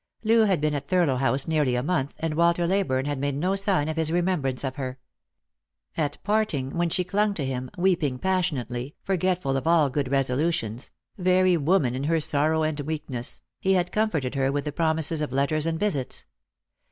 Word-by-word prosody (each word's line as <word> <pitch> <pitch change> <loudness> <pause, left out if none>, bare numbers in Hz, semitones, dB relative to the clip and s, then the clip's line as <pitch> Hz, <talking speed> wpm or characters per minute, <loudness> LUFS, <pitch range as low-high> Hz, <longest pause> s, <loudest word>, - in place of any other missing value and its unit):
Loo 225 0 +4
had 190 -6 +2
been 150 0 0
at 140 -1 -4
Thurlow 170 -7 +2
House 135 +2 +2
nearly 150 -6 +1
a 125 - -1
month, 145 -4 -1
and 165 -1 -2
Walter 170 +2 +2
Leyburne 170 -8 0
had 145 -2 -2
made 140 0 -1
no 180 +7 0
sign 195 -6 +1
of 160 0 -3
his 160 -1 +1
remembrance 170 -8 0
of 130 -1 -3
her. 130 -2 -4 1.0
At 145 -3 -1
parting, 205 -11 0
when 170 0 +1
she 180 +2 0
clung 205 +3 0
to 145 - -2
him, 130 -1 -4
weeping 170 -8 +1
passionately, 145 - -2
forgetful 185 -6 0
of 135 +3 -2
all 160 -5 +4
good 140 -1 -1
resolutions 135 -3 0 0.2
— - - -63
very 185 0 +3
woman 155 -4 +2
in 130 +2 -3
her 165 +1 +2
sorrow 155 +1 +1
and 155 -1 -1
weak 155 0 -4
ness 120 -1 -2
— - - -63
he 190 - +2
had 180 -1 +1
comforted 170 -12 0
her 135 -1 +1
with 145 +1 -2
promises 160 -1 +1
of 150 - -2
letters 145 +4 0
and 160 0 -1
visits. 175 -11 -1
155 Hz, 195 wpm, -25 LUFS, 135-180 Hz, 1.0 s, Loo